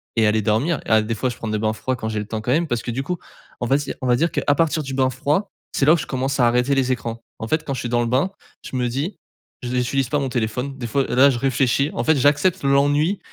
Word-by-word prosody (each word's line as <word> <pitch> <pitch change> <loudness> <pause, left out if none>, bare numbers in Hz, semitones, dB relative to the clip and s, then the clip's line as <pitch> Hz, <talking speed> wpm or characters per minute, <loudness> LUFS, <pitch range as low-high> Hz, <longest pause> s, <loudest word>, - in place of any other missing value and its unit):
et 115 -2 +3
aller 110 +1 +2
dormir 115 +9 +1
à 110 -1 +4
des 110 +1 -2
fois 125 +4 -1
je 120 - -6
prends 115 - -6
des 110 0 -1
bains 110 0 0
froids 130 +4 -2
quand 110 - -4
j'ai 110 -1 -2
le 105 - -4
temps, 110 0 -3
quand 120 - -2
même. 165 +5 +2
Parce 120 -5 -1
que 120 - -3
du 130 +3 -3
coup, 180 +5 -3 0.4
on - - -2
va 135 - +3
dire 145 - -4
on 130 - -2
va 125 - +4
dire 165 +6 +1
qu'à - - -1
partir 160 0 +1
du 135 -1 -6
bain 130 -1 +2
froid, 145 - -1 0.2
c'est 135 - +2
là 150 - +6
ou - - +3
je - - -4
commence 135 +1 -2
à 120 - +5
arrêter 125 +3 +2
les 130 -1 +1
écrans. 115 -1 -5 0.2
En 110 - -4
fait, 155 - 0
quand 140 - -2
je 130 - -4
suis 120 - -4
dans 120 0 +1
le 120 - 0
bain, 130 +10 +1 0.3
je - - -7
me 125 -1 0
dis: 140 - -3 0.5
«Je 120 - -3
n'utilise 125 +1 0
pas 145 - +1
mon 140 - -1
téléphone» 125 +3 -2
des 120 -3 -4
fois 135 +4 +1
là, 130 +3 +5
je 120 - -2
réfléchis 135 +2 +1
en - - -2
fait, 160 - +3
j'accepte 145 +7 +2
l'ennui 145 +7 +2
130 Hz, 295 wpm, -21 LUFS, 120-145 Hz, 0.5 s, là